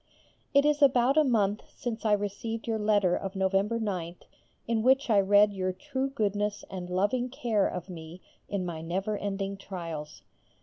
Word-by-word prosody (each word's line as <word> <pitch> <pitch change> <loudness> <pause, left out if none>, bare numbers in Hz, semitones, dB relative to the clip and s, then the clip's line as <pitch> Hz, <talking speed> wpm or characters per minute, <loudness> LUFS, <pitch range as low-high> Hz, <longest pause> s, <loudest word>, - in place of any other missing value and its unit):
It 280 0 +4
is 295 0 +2
about 265 -1 +5
a 310 - +6
month 210 -6 +1
since 230 -2 -5
I 215 - +4
received 205 +3 -2
your 225 -1 -1
letter 205 -4 +3
of 195 0 -4
November 195 +4 +1
9th 180 -5 -4 0.4
in 230 -1 +1
which 260 +1 +3
I 205 - +6
read 205 +1 +5
your 185 -1 -1
true 270 +4 -3
goodness 210 -5 -1
and 180 -2 -6
loving 205 +8 0
care 240 -6 +1
of 180 -1 -5
me 165 -1 -9 0.3
in 195 -3 -2
my 165 -2 -5
never 190 +6 -2
ending 200 -1 -3
trials. 165 -6 -7
205 Hz, 170 wpm, -29 LUFS, 190-230 Hz, 0.4 s, a